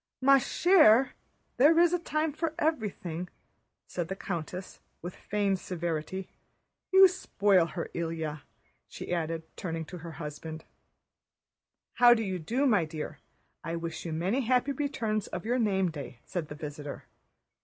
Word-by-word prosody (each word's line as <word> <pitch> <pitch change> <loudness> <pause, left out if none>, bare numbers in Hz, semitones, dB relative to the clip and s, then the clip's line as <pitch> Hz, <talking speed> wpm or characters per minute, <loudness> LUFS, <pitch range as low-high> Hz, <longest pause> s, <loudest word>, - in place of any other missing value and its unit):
"Ma 275 +1 +6
chère, 270 - +5 0.5
there 300 +6 +6
is 345 0 +5
a 355 - +2
time 310 -2 -1
for 320 +1 -2
everything," 195 - -2 0.6
said 175 -2 -4
the 195 - -4
countess 180 0 -5 0.2
with 175 +1 -6
feigned 200 -2 -1
severity. 175 +1 -3 0.6
"You 385 0 +9
spoil 200 - +2
her, 170 0 -5
Ilyá," 160 -3 -3 0.5
she - - -6
added, 165 -1 -2
turning 165 -2 -4
to 180 +3 -9
her 165 0 -8
husband. 160 0 -7 1.3
"How 240 0 +8
do 225 - -1
you 190 -3 -3
do, 240 - 0
my 210 -10 +4
dear? 155 -1 -6 0.4
I 165 +2 -3
wish 165 0 -5
you 165 - -4
many 185 +11 0
happy 255 +2 +2
returns 230 -7 -2
of 175 - -6
your 245 +3 +1
name 190 -5 +1
day," 145 -5 -8
said 175 -4 -4
the 150 - -8
visitor. 145 -1 -7
190 Hz, 145 wpm, -29 LUFS, 165-255 Hz, 1.3 s, You